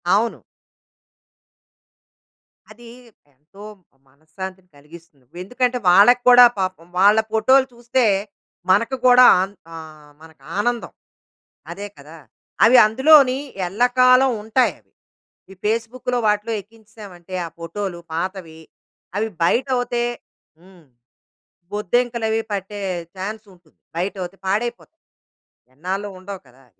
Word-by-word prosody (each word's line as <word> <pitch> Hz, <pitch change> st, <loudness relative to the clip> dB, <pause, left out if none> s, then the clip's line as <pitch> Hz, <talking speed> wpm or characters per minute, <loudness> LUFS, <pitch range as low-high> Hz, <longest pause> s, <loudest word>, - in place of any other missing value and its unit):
అవును. 225 Hz, +3 st, 0 dB, 2.3 s
అది 235 Hz, +2 st, -15 dB, 0.5 s
ఎంతో 155 Hz, +9 st, -17 dB, 0.4 s
మనశ్శాంతిని 180 Hz, +6 st, -11 dB
కలిగిస్తుంది. 150 Hz, -2 st, -17 dB, 0.2 s
ఎందుకంటే 250 Hz, +4 st, -1 dB
వాళ్ళకి 205 Hz, +8 st, +6 dB
కూడా 245 Hz, 0 st, +9 dB
పాపం 185 Hz, -3 st, -4 dB
వాళ్ళ 205 Hz, +3 st, +5 dB
ఫోటోలు 260 Hz, +5 st, +3 dB
చూస్తే 240 Hz, +2 st, -1 dB, 0.7 s
మనకు 230 Hz, +7 st, +2 dB
కూడా 250 Hz, 0 st, +7 dB, 0.2 s
ఆన్ 195 Hz, +2 st, -4 dB, 0.2 s
ఆహ్, 155 Hz, -2 st, -12 dB
మనకు 160 Hz, -1 st, -18 dB
ఆనందం. 240 Hz, +3 st, -2 dB, 0.8 s
అదే 200 Hz, +4 st, -7 dB
కదా! 150 Hz, +3 st, -14 dB, 0.5 s
అవి 245 Hz, +3 st, +6 dB
అందులోని 265 Hz, +3 st, +5 dB, 0.3 s
ఎల్లకాలం 255 Hz, +5 st, +3 dB
ఉంటాయి 225 Hz, +4 st, +1 dB
అవి. -, -, -39 dB, 0.6 s
ఈ -, -, -11 dB
ఫేస్‌బుక్‌లో 230 Hz, +3 st, -2 dB
వాటిలో 210 Hz, +2 st, 0 dB
ఎక్కించేసామంటే 210 Hz, -4 st, -15 dB
ఆ -, -, -6 dB
ఫోటోలు 170 Hz, +2 st, -6 dB
పాతవి 170 Hz, -1 st, -5 dB, 0.6 s
అవి 220 Hz, +2 st, -1 dB, 0.2 s
బయటౌతే 245 Hz, +3 st, 0 dB, 0.5 s
హ్మ్. 180 Hz, -2 st, -20 dB, 0.9 s
బొద్దింకలవి 225 Hz, +2 st, -1 dB
పట్టే 205 Hz, +1 st, -5 dB, 0.4 s
ఛాన్స్ 215 Hz, +3 st, -6 dB
ఉంటుంది. 175 Hz, -3 st, -27 dB, 0.2 s
బయటౌతే 185 Hz, +1 st, -4 dB
పాడైపోతాయి. 240 Hz, -, -4 dB, 0.7 s
ఎన్నాళ్ళో 190 Hz, +7 st, -4 dB
ఉండవు 190 Hz, 0 st, -9 dB
కదా! 130 Hz, +2 st, -23 dB
205 Hz, 100 wpm, -20 LUFS, 180-240 Hz, 2.3 s, కూడా